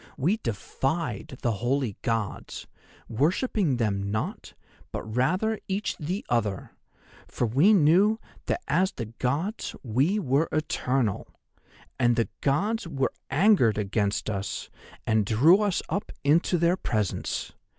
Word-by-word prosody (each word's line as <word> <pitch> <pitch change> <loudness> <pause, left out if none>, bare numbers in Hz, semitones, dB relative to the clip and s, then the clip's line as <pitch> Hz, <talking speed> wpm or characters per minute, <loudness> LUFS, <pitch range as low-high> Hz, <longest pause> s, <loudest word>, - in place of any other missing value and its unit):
We 180 +11 +2
defied 135 - -3
the 120 - +2
holy 120 +1 -1
Gods, 115 -4 -3 0.4
worshipping 160 - +1
them 100 -4 -1
not, 110 +2 -4 0.4
but - - -4
rather 175 - 0
each 200 +2 -2
the 180 +7 -3
other, 105 -5 -1 0.6
for - - -1
we 140 - +4
knew 195 +4 +4 0.3
that 360 - -1
as 190 +2 +2
the 115 - -4
Gods 155 - -2
we 135 - +1
were 150 -4 +1
eternal. 130 -7 0 0.7
And 120 -2 +3
the 115 -1 0
Gods 200 +10 0
were 135 -5 -1 0.2
angered 155 - +4
against 100 0 -1
us 100 -2 -4 0.3
and 110 -1 +2
drew 145 - +5
us 205 -4 0
up 200 - -3
into 165 +5 +3
their 170 +2 +2
presence. 105 - -2
135 Hz, 125 wpm, -27 LUFS, 115-185 Hz, 0.7 s, drew